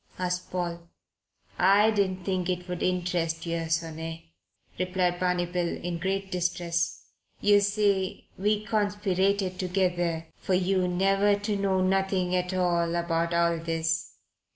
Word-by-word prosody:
asked 180 0 -2
Paul. 170 -1 -4 0.7
"I 200 +4 +5
didn't 190 -3 0
think 185 -2 -1
it 180 0 -2
would 180 -1 -4
interest 175 -2 -1
yer, 165 -1 -2
sonny," 165 0 -3 0.5
replied 180 -1 0
Barney 180 -1 +1
Bill, 175 -1 -2
in 175 -1 -4
great 195 +2 -2
distress. 175 -1 -1 0.4
"Yer 205 0 +5
see, 200 -2 0
we 210 +2 0
conspirated 200 -2 0
together 175 -3 0
for 185 - 0
yer 185 0 +1
never 195 +3 +3
to 205 0 -1
know 195 -1 +1
nothing 190 -1 +1
at 180 0 0
all 175 -2 +1
about 170 0 0
all 170 -1 +2
this. 165 0 -2
180 Hz, 130 wpm, -27 LUFS, 170-195 Hz, 0.7 s, I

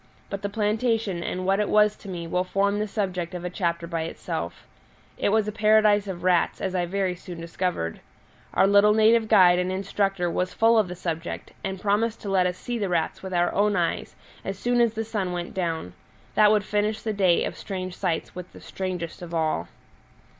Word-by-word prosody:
But 200 - -4
the 205 - -2
plantation 215 -2 0
and 185 +1 -3
what 195 +1 +2
it 210 - 0
was 210 0 +4
to 200 - -11
me 175 -2 -5
will 180 +2 0
form 200 +2 0
the 215 - -1
subject 180 -4 -3
of 175 0 -5
a 180 - -3
chapter 170 -2 -1
by 165 -1 -3
itself. 160 - -5 0.5
It - - 0
was 215 0 +2
a - - -1
paradise 210 -1 +4
of 180 -2 -6
rats, 180 -2 +2
as 190 - -2
I 175 -1 0
very 190 0 0
soon 180 -1 -9
discovered. 170 - -3 0.6
Our - - +5
little 205 +1 +5
native 220 +1 +4
guide 180 -3 +6
and 180 +1 -1
instructor 195 -1 -1
was 180 +2 -2
full 225 0 +5
of 210 - +2
the 180 - -6
subject, 170 -1 -5
and 190 -1 -3
promised 210 +3 0
to 205 - -4
let 185 -2 +3
us 180 0 -3
see 240 +3 -4
the 200 -3 -1
rats 165 -2 -1
with 190 - -7
our 175 -1 +1
own 205 +1 +2
eyes - - -1 0.3
as 195 0 -4
soon 240 +3 +1
as 230 -2 +2
the 225 0 -2
sun 200 -5 -2
went 175 -1 -4
down; 165 - -3 0.4
that 210 -1 +5
would 210 -1 +3
finish 210 +1 -1
the 220 - -1
day 185 -4 +3
of - - -3
strange 185 -2 -5
sights 175 -4 -2
with 180 0 -8
the - - -12
strangest 180 -3 -5
of 170 -1 -6
all. 155 - 0
190 Hz, 210 wpm, -25 LUFS, 175-210 Hz, 0.6 s, guide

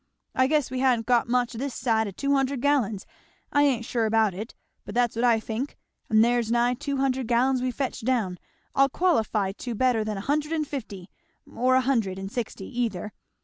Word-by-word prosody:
I 260 0 +3
guess 295 -3 +1
we 260 - -2
ha'n't 250 -4 +2
got 245 +1 +3
much 245 0 +1
this 260 +2 -4
side 225 -3 +1
o' - - -3
two 280 +9 -1
hundred 270 -1 +1
gallon 260 -6 +1 0.6
I 290 - +4
ain't 260 -5 +2
sure 230 -2 0
about 220 -2 +2
it, 215 +6 -7 0.3
but - - -9
that's 240 -2 +2
what 230 - -1
I 235 -2 +4
think; 225 +5 -4 0.3
and 220 +1 +5
there's 240 -1 +1
nigh 240 +1 +3
two 280 +3 -3
hundred 265 -2 0
gallon 250 +2 +2
we've 255 -1 -2
fetched 270 -5 -3
down; 220 -8 0 0.3
I'll 275 0 +4
qualify 225 - +1
to 235 +4 -6
better 245 -1 +2
than 215 -1 -3
a - - -4
hundred 300 +6 -1
and 310 -2 -1
fifty, 205 -10 -7 0.3
or 255 +2 +1
a 260 - +5
hundred 230 -8 0
and 195 +1 -6
sixty 220 -5 -4 0.2
either. 210 -3 -3
245 Hz, 205 wpm, -26 LUFS, 220-265 Hz, 0.6 s, and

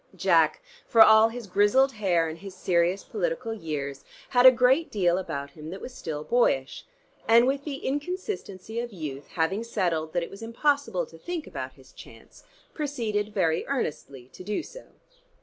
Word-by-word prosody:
Jack, - - +3 0.2
for 225 -1 +8
all 220 +1 +6
his 235 0 -7
grizzled 205 +8 +3
hair 185 -7 +1
and 160 +1 -7
his 195 0 -10
serious 180 +1 +1
political 485 - -3
years, 145 -8 -5 0.3
had 250 +1 +6
a - - +11
great 255 +6 +3
deal 180 -3 +1
about 140 -6 -5
him 155 +2 -10
that 190 +3 -7
was 255 - -8
still 150 -9 -5
boyish, 155 - 0 0.4
and 230 +1 +6
with 275 +2 -1
the 280 -3 -6
inconsistency 285 - -4
of 240 0 -4
youth 150 -7 -7
having 190 +6 0
settled 165 -8 -1
that 175 -1 0
it - - -8
was 200 - -11
impossible 285 - 0
to 475 - -16
think 350 -3 -5
about - - -6
his - - -19
chance, - - -15 0.3
proceeded 225 -9 -2
very 165 -5 +1
earnestly 145 - -4
to - - -10
do 210 - -2
so. - - -12
210 Hz, 170 wpm, -26 LUFS, 170-260 Hz, 0.4 s, a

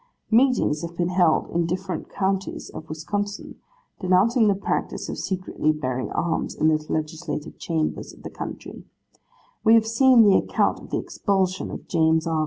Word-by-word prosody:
Meetings 230 - +3
have 170 0 -7
been 175 0 0
held 180 -3 +2
in 170 -1 0
different 180 -1 -4
counties 195 -1 -2
of 160 - -9
Wisconsin, 205 +6 -4 0.4
denouncing 210 +5 +3
the 200 - +3
practice 195 - -3
of - - -5
secretly 185 -5 -1
bearing 130 -4 -3
arms 170 0 -2
in 155 - +3
the 155 -1 +1
Legislative 155 0 -4
chambers 160 -2 -2
of - - -17
the - - -7
country. - - -8 0.8
We 225 +1 +6
have 225 -1 +4
seen 235 +1 +5
the 200 -2 +6
account - - +1
of - - -13
the - - -1
expulsion 190 -2 -1
of - - -8
James 160 -1 +2
R. 165 -1 0
180 Hz, 165 wpm, -24 LUFS, 160-205 Hz, 0.8 s, We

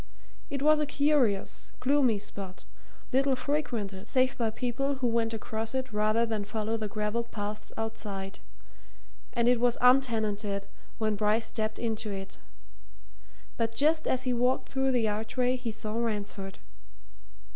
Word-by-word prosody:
It 280 -2 -2
was 305 0 +6
a 300 - 0
curious, 280 -9 +1
gloomy 260 -4 +3
spot, 195 -2 -8 0.5
little 270 +1 +4
frequented 235 -9 -2
save 260 0 +3
by 230 -2 +1
people 255 +5 -1
who 260 -1 -2
went 230 -1 +2
across 225 +1 -3
it 260 -3 -2
rather 215 +2 +3
than 220 -2 -2
follow 215 +2 -2
the 220 -1 -2
gravelled 215 +3 -2
paths 210 0 -5
outside, 205 -3 -4 0.9
and 235 -1 +2
it 245 -1 +5
was 245 0 +3
untenanted 220 -6 +3 0.3
when 215 -1 +1
Bryce 215 +2 +2
stepped 215 -1 -2
into 220 -2 -2
it. 195 -1 -6 1.2
But 225 -1 -1
just 310 +4 +3
as 255 - +1
he 255 -1 +1
walked 250 +2 +1
through 265 0 +2
the 240 -3 +2
archway 225 +4 0
he 250 -2 -4
saw 215 -1 -4
Ransford. 210 -4 -2
225 Hz, 145 wpm, -29 LUFS, 210-255 Hz, 1.2 s, was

